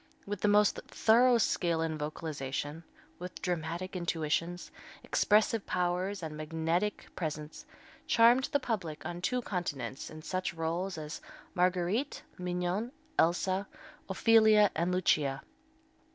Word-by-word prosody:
with 205 -1 -4
the - - +3
most 205 0 +4
thorough 240 +2 +4
skill 170 -6 +1
in 160 -1 -1
vocalization, 150 0 -4 0.4
with 180 +1 -7
dramatic 175 +1 -3
intuitions, 170 0 -2 0.3
expressive 215 0 +2
powers 180 +1 -1
and 155 -1 -5
magnetic 165 +6 -1
presence, 155 - -5 0.4
charmed 240 +3 +5
the 285 - 0
public 185 - -4
on 175 0 -5
two 245 +7 0
continents 155 - -4
in 155 - -9
such 185 0 -2
rôles 170 +3 -2
as 150 -1 -6 0.3
Marguerite, 185 +8 0 0.2
Mignon, 180 +5 -2 0.3
Elsa, 185 +4 +2 0.4
Ophelia 215 +1 +5
and 170 +3 0
Lucia. 150 -7 +1
180 Hz, 115 wpm, -31 LUFS, 160-205 Hz, 0.4 s, charmed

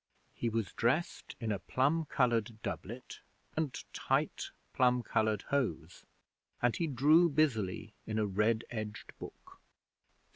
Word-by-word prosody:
He 120 - -1
was 110 -3 -2
dressed 130 +9 0
in 115 -2 -2
a 100 - -1
plum 150 +9 +1
coloured 120 -6 +1
doublet 115 +3 -6 0.4
and 155 -4 -1
tight - - 0 0.2
plum 125 -1 +3
coloured 110 -3 +1
hose, 90 - -1 0.5
and 120 -1 +2
he 170 - 0
drew 155 +6 +5
busily 110 - 0
in 110 - -2
a 110 - +2
red 105 +3 +1
edged 110 -2 -5
book. - - -11
115 Hz, 130 wpm, -33 LUFS, 110-140 Hz, 0.5 s, drew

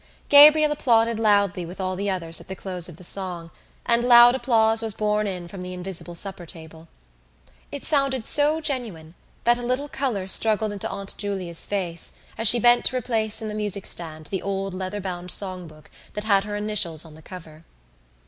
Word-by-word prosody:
Gabriel 300 +1 +8
applauded 230 -5 +1
loudly 200 -4 +1
with 175 +3 -10
all 185 0 -3
the 200 +2 -3
others 165 -3 -2
at - - -14
the 190 - -6
close 180 -2 -7
of 165 - -13
the 180 - -13
song 175 -2 -3 0.3
and 235 0 +2
loud 240 0 +7
applause 225 -3 +2
was 225 -2 -3
borne 210 0 -1
in 180 -3 -6
from 185 +1 -10
the 180 0 -7
invisible 180 -1 -7
supper 190 0 -3
table. 160 -1 -11 0.8
It 285 - -7
sounded 275 -5 0
so 300 +2 +4
genuine 220 - -3 0.3
that 240 0 +2
a - - -7
little 255 +4 -2
colour 250 -10 -3
struggled 215 +2 +3
into 205 +2 -5
Aunt 195 0 -5
Julia's 190 -5 -3
face 180 -5 -4 0.2
as 225 0 +2
she 240 - +9
bent 240 +1 +4
to 255 - +1
replace 225 -2 0
in - - -4
the 210 - -5
music 205 -2 -3
stand 155 -2 -2
the 190 - -3
old 195 -1 -4
leather 190 +2 -5
bound 180 -1 -6
songbook 175 -6 -2 0.2
that 210 - -5
had 200 -2 +2
her 205 0 -5
initials 205 -7 -2
on 160 - -13
the 160 - -15
cover. 160 -2 -12
200 Hz, 190 wpm, -23 LUFS, 180-230 Hz, 0.8 s, she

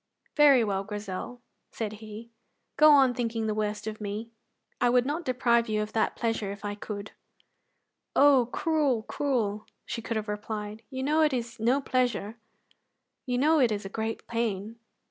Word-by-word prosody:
"Very 285 -5 +6
well, 195 -2 -1
Grizel," 210 +4 -6 0.3
he - - -27
said, 215 +1 -6 0.5
"go 305 0 +7
on 270 -3 +6
thinking 230 -2 -2
the 215 - 0
worst 210 0 -2
of 215 0 -5
me; 210 +3 -5 0.5
I 245 - +4
would 245 0 +3
not 300 +4 -2
deprive 235 -2 +2
you 215 0 0
of 210 - -8
that 220 - +1
pleasure 225 -4 -1
if 200 +1 -8
I 205 - -2
could." 205 0 -7 1.0
"Oh, 275 -4 +5
cruel, 295 -8 +1
cruel!" 220 -7 -1 0.2
she 230 - -4
could 230 0 -3
have 215 0 -3
replied; 210 0 -5
"you 260 -1 -4
know 305 +3 +2
it 305 -3 +3
is 235 -1 -4
no 245 +5 +2
pleasure; 245 -5 -1 0.9
you 250 -1 0
know 310 +4 +4
it 245 -4 +4
is 205 -1 -3
a - - -5
great 220 +2 -4
pain." 225 -1 -3
230 Hz, 170 wpm, -28 LUFS, 210-255 Hz, 1.0 s, go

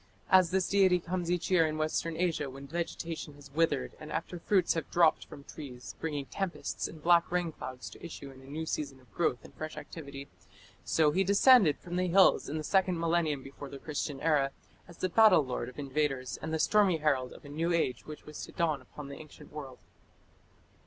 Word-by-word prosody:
As 185 -2 +6
this 190 0 +1
deity 190 -2 +4
comes 175 0 -3
each 175 +1 -1
year 165 -3 +5
in 155 0 -3
Western 155 +1 -1
Asia 165 -5 0
when 135 +1 -9
vegetation 165 -1 -4
has 140 -1 -14
withered 155 - +1
and - - -9
after 175 - -4
fruits 185 0 +2
have 165 -3 -3
dropped 170 -2 +3
from 140 - -11
trees, 130 -5 -9
bringing 145 -4 -3
tempests 190 +4 -3
and 155 -2 -12
black 170 0 +5
rainclouds 165 -7 -3
to - - -14
issue 145 -5 -8
in 130 0 -14
a - - -15
new 155 +4 -5
season 140 -4 -3
of 125 -6 -24
growth 125 - 0
and - - -14
fresh 155 0 -7
activity, 140 -3 -8 0.6
so 155 -2 +3
he 190 +5 +2
descended 200 - +6
from 175 0 -6
the 185 0 +1
hills 190 +2 +5
in 155 - -2
the 155 - -3
second 185 0 +2
millennium 165 -4 +1
before 140 +1 -9
the 140 - -8
Christian 145 -1 -4
era 150 -4 +3 0.4
as 170 -1 -14
the 185 - 0
battle 185 -5 +6
lord 125 -1 -3
of 125 - -15
invaders 135 -3 -2
and 160 - -4
the 160 - +1
stormy 195 +1 +4
herald 140 -5 +1
of - - -13
a - - -9
new 165 +4 -1
age 145 -8 0
which 155 -1 -9
was 150 0 -8
to - - -13
dawn 160 -4 0
upon 150 -2 -10
the 140 - -8
ancient 155 -1 -14
world. 135 -4 -7
155 Hz, 205 wpm, -31 LUFS, 140-175 Hz, 0.6 s, As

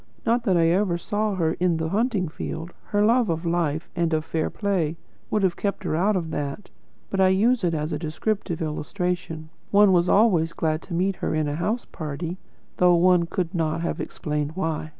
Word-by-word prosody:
Not 235 +1 +2
that 190 -5 +3
I 165 -1 +4
ever 180 0 +2
saw 210 +3 -1
her 165 -3 +1
in 175 -2 +2
the 160 0 -2
hunting 210 -2 +1
field; 160 +2 -6
her 205 0 +2
love 235 -1 +3
of 165 +1 -2
life 165 -2 0
and 170 -2 +1
of 155 0 -2
fair 160 -1 -1
play 180 -6 -1 0.3
would 210 - +1
have 185 -2 +2
kept 200 -1 -2
her 170 - -1
out 200 +6 +2
of 165 -3 -2
that. 145 +8 -4 0.4
But 195 - +1
I 190 - +6
use 215 +5 +3
it 170 -2 +1
as 155 +1 -2
a 150 - -2
descriptive 170 +2 -2
illustration. 165 0 -3 0.2
One 205 -1 +6
was 175 0 +3
always 180 -7 +4
glad 155 0 -1
to 175 - -5
meet 185 +2 0
her - - -2
in 155 -1 +1
a 145 - -2
house 215 +9 -1
party, 160 +4 -5 0.4
though 180 -1 +5
one 175 0 +4
could 170 -1 -2
not 165 -2 0
have 170 - -2
explained 150 -2 -3
why. 160 -4 -2
175 Hz, 205 wpm, -24 LUFS, 160-195 Hz, 0.4 s, I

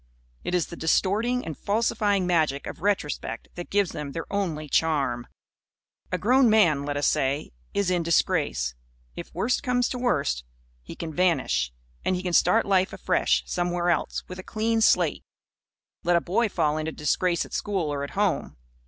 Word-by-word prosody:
It 180 - -1
is 175 - +2
the 170 - -9
distorting 210 +10 +1
and 160 - -5
falsifying 205 -1 +1
magic 155 -6 +1
of - - -7
retrospect 195 -7 -2
that 175 - -7
gives 200 -3 +1
them 145 -2 -6
their 165 - -4
only 165 -7 -2
charm. 140 -6 +1 0.8
A - - +1
grown 250 +3 +4
man, 170 -10 +4
let 145 0 -2
us 145 - 0
say, 135 +3 0 0.2
is 200 -2 +1
in 175 -1 +2
disgrace. 160 - +1 0.4
If - - -8
worst 250 +3 +1
comes 250 -2 +1
to 250 - -4
worst, 65 - 0 0.4
he - - -10
can 160 -2 -6
vanish; 130 - +1 0.3
and 185 - +1
he 180 - -4
can 180 -1 -2
start 200 +7 +4
life, 190 -1 +2
afresh, - - +1
somewhere 175 0 0
else, 160 - -1
with 185 0 -8
a - - -7
clean 225 +2 0
slate. - - +3 0.8
Let 175 0 +3
a - - +5
boy 215 +7 +1
fall 150 -5 +1
into 155 +1 -2
disgrace 170 +4 0
at - - -14
school 185 -8 -1
or 140 -1 -3
at 140 - -4
home. 205 - 0
175 Hz, 175 wpm, -26 LUFS, 150-205 Hz, 0.8 s, a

